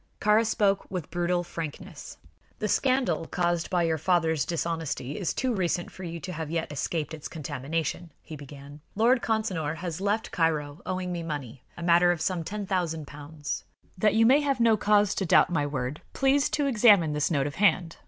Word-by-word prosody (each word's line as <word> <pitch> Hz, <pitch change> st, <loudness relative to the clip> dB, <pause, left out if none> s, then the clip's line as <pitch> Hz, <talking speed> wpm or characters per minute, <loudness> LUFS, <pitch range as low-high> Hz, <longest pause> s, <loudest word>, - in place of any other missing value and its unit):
Kāra 210 Hz, +2 st, +4 dB
spoke 205 Hz, -3 st, +1 dB
with 180 Hz, -5 st, -5 dB
brutal 175 Hz, 0 st, 0 dB
frankness. 165 Hz, -3 st, -7 dB, 0.4 s
"The 215 Hz, -, -2 dB
scandal 245 Hz, -, +1 dB
caused 175 Hz, -1 st, -1 dB
by 180 Hz, -2 st, +1 dB
your 160 Hz, -1 st, 0 dB
father's 160 Hz, -3 st, +1 dB
dishonesty 165 Hz, -5 st, -3 dB
is 180 Hz, -, -1 dB
too 255 Hz, -1 st, -1 dB
recent 175 Hz, -3 st, -1 dB
for 185 Hz, -, -10 dB
you 170 Hz, -1 st, -5 dB
to 185 Hz, -1 st, -6 dB
have 160 Hz, -2 st, -5 dB
yet 165 Hz, -1 st, -2 dB
escaped 155 Hz, +2 st, -3 dB
its 155 Hz, -2 st, -6 dB
contamination," 160 Hz, +3 st, -4 dB
he 155 Hz, -, -9 dB
began. 145 Hz, 0 st, -11 dB
"Lord 235 Hz, +4 st, +3 dB
Consinor 190 Hz, -9 st, -1 dB
has 170 Hz, +1 st, -5 dB
left 205 Hz, +2 st, -1 dB
Cairo 155 Hz, -3 st, -1 dB
owing 185 Hz, -1 st, -2 dB
me 175 Hz, -1 st, -3 dB
money, 145 Hz, -7 st, -6 dB, 0.2 s
a 170 Hz, -, -6 dB
matter 175 Hz, +1 st, +5 dB
of 175 Hz, -, -2 dB
some 170 Hz, +1 st, -1 dB
ten 205 Hz, +4 st, -5 dB
thousand 170 Hz, -5 st, -2 dB
pounds. 145 Hz, +1 st, -6 dB, 0.3 s
That 210 Hz, +3 st, +2 dB
you 225 Hz, 0 st, +5 dB
may 270 Hz, +5 st, +6 dB
have 275 Hz, -3 st, 0 dB
no 230 Hz, -1 st, +5 dB
cause 210 Hz, -1 st, +3 dB
to -, -, -2 dB
doubt 180 Hz, -, +4 dB
my 145 Hz, -4 st, 0 dB
word, 135 Hz, 0 st, -4 dB
please 275 Hz, +1 st, +2 dB
to 290 Hz, -, 0 dB
examine 210 Hz, -, +5 dB
this 150 Hz, -1 st, 0 dB
note 140 Hz, -5 st, +1 dB
of 145 Hz, -, -5 dB
hand. 180 Hz, -5 st, +2 dB
170 Hz, 190 wpm, -27 LUFS, 155-205 Hz, 0.4 s, may